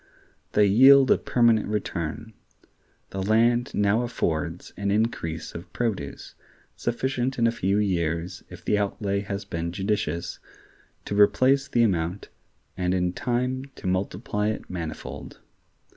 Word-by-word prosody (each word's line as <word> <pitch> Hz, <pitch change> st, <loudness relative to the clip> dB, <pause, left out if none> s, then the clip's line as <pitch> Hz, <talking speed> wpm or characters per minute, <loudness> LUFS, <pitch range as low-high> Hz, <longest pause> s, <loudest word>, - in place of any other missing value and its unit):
They 105 Hz, -, +5 dB
yield 130 Hz, +6 st, +7 dB
a -, -, +6 dB
permanent 115 Hz, -3 st, +3 dB
return; 105 Hz, 0 st, -3 dB, 0.8 s
the 95 Hz, -, -3 dB
land 115 Hz, +4 st, +2 dB
now 105 Hz, +3 st, +2 dB
affords 85 Hz, -8 st, -2 dB
an 100 Hz, 0 st, -2 dB
increase 100 Hz, -7 st, -1 dB
of 85 Hz, +4 st, -9 dB
produce, 100 Hz, -13 st, -3 dB, 0.4 s
sufficient 130 Hz, +2 st, -1 dB
in 115 Hz, -, +2 dB
a 115 Hz, -, +4 dB
few 100 Hz, -3 st, 0 dB
years, 85 Hz, -3 st, -1 dB
if -, -, -12 dB
the 105 Hz, -, +2 dB
outlay 100 Hz, 0 st, -1 dB
has 100 Hz, 0 st, -5 dB
been 85 Hz, 0 st, -3 dB
judicious, 90 Hz, -3 st, -2 dB, 0.7 s
to -, -, -4 dB
replace 130 Hz, +7 st, +4 dB
the 120 Hz, -, +2 dB
amount, 90 Hz, -2 st, -1 dB, 0.5 s
and 90 Hz, 0 st, 0 dB
in 90 Hz, -1 st, 0 dB
time 125 Hz, +4 st, -1 dB
to -, -, -12 dB
multiply 100 Hz, +3 st, -1 dB
it 110 Hz, -, -3 dB
manifold. 80 Hz, -4 st, -6 dB
100 Hz, 130 wpm, -25 LUFS, 90-115 Hz, 0.8 s, yield